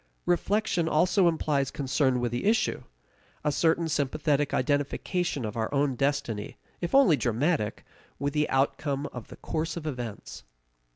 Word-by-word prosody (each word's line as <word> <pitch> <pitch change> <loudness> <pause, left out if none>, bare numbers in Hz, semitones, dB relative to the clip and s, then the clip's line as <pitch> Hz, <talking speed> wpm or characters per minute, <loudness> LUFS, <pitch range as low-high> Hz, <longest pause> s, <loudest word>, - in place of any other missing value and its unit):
Reflection 175 -1 +1
also 180 +4 +3
implies 150 -5 +1
concern 130 -2 +1
with 120 -1 -1
the 120 +7 -2
issue 220 +1 +2 0.6
a 150 - +2
certain 165 +2 +2
sympathetic 145 0 0
identification 145 - -1
of 105 - -5
our 110 -1 -2
own 140 -1 +1
destiny, 125 -5 -2 0.2
if 175 +8 -1
only 240 - +6
dramatic, 125 -1 0 0.3
with 140 +1 -2
the 150 0 +1
outcome 140 +1 0
of 125 -3 -7
the - - -12
course 160 +1 -3
of 160 - -6
events. 120 -8 -6
145 Hz, 140 wpm, -28 LUFS, 130-165 Hz, 0.6 s, only